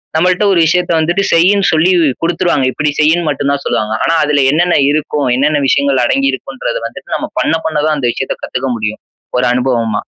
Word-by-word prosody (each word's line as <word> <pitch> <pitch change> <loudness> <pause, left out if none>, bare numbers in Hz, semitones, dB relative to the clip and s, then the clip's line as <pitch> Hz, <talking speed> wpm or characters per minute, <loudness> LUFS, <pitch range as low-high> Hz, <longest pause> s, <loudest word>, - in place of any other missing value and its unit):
நம்மள்ட்ட 180 +4 +2
ஒரு 175 - +2
விஷயத்த 180 +1 0
வந்துட்டு 175 +5 0
செய்யின்னு 195 +4 +3
சொல்லி 165 +4 +3 0.3
குடுத்துருவாங்க. 165 -5 0
இப்படி 150 +4 -1
செய்யின்னு 160 +2 +2
மட்டும் 140 - -2
தான் 140 0 -2
சொல்லுவாங்க. 110 0 -1
ஆனா, 165 - +1
அதுல 145 -1 +1
என்னென்ன 175 +3 +2 0.2
இருக்கும், 150 -1 -1
என்னென்ன 150 +3 +1
விஷயங்கள் 140 -1 +2
அடங்கி 275 - +1
இருக்கும்ன்றத - - -5
வந்துட்டு - - -10
நம்ம - - -4
பண்ண - - +1
பண்ண 155 -1 -1
தான் 155 -1 +1
அந்த 125 -3 -1
விஷயத்த 135 - -4
கத்துக்க 130 +1 -3
முடியும் 110 -1 -4 0.4
ஒரு 125 - +1
அனுபவமா. 120 -4 -1
155 Hz, 185 wpm, -13 LUFS, 135-175 Hz, 0.4 s, செய்யின்னு